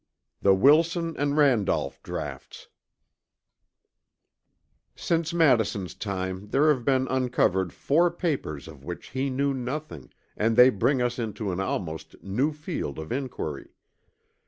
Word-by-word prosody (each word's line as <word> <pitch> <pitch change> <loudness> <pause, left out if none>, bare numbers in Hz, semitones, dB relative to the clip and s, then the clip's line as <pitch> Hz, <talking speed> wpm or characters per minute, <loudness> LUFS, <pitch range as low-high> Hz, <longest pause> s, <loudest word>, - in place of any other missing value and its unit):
CHAPTER - - -55
XI - - -53
THE 95 -1 +5
WILSON 165 - +3
AND 145 +1 0
RANDOLPH 130 -9 +2
DRAUGHTS - - -7 2.3
Since 165 -1 -1
Madison's 115 - +2
time 95 -1 -4
there 145 +8 +3
have 125 -4 -6
been 130 0 +2
uncovered 120 -9 +1
four 170 +5 +2
papers 145 - -3
of 75 -4 -12
which 90 +3 -7
he 135 +1 -1
knew 140 +2 0
nothing, 130 - -5 0.2
and 115 +1 +1
they 125 +2 +8
bring 125 +5 +1
us 120 0 -1
into 110 -3 -3
an 90 - -3
almost 85 -4 -4
new 125 +11 0
field 150 - -5
of 80 0 -7
inquiry. 120 - -5
125 Hz, 135 wpm, -26 LUFS, 95-145 Hz, 2.3 s, they